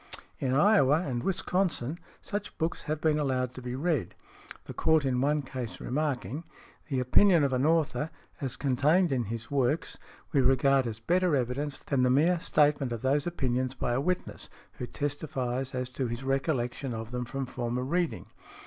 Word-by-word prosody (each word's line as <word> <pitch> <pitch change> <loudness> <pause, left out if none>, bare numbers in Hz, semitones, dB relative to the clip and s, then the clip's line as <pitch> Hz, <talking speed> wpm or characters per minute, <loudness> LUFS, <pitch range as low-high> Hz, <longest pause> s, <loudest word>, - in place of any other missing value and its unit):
|100| 135 - 0
In 130 - +1
Iowa 155 -4 +5
and 125 -4 -2
Wisconsin 175 -5 -1 0.2
such 205 0 -5
books 160 +1 -2
have 155 0 -2
been 155 -1 +2
allowed 130 -3 0
to 130 - -8
be 125 0 -4
read, 140 - -1 0.5
the - - -7
Court 160 -2 +3
in 125 -2 +1
one 145 +1 +1
case 130 -3 -6
remarking, 140 - -2 0.4
"The 135 -4 -1
opinion 165 +6 +5
of 135 -2 +1
an 130 +3 +2
author, 160 -1 +1 0.3
as 135 -3 -2
contained 150 +6 +2
in 125 -3 0
his 115 +4 -6
works, 140 +2 0 0.3
we 140 - +4
regard 135 0 +3
as 115 -1 -5
better 175 +6 +2
evidence 135 +3 -1
than 140 -3 -1
the 125 - +4
mere 165 +7 +3
statement 145 -5 +2
of 115 -2 -4
those 145 +4 +2
opinions 130 -5 -1
by 120 -2 -1
a 125 - +1
witness, 180 +4 -3 0.3
who 125 - -3
testifies 135 -3 -3
as 125 0 -2
to 130 0 -2
his 120 +2 -5
recollection 135 -2 -1
of 110 +1 -6
them 125 0 -2
from 135 +2 -3
former 125 0 -3
reading. 170 +5 -1
135 Hz, 175 wpm, -29 LUFS, 125-155 Hz, 0.5 s, Iowa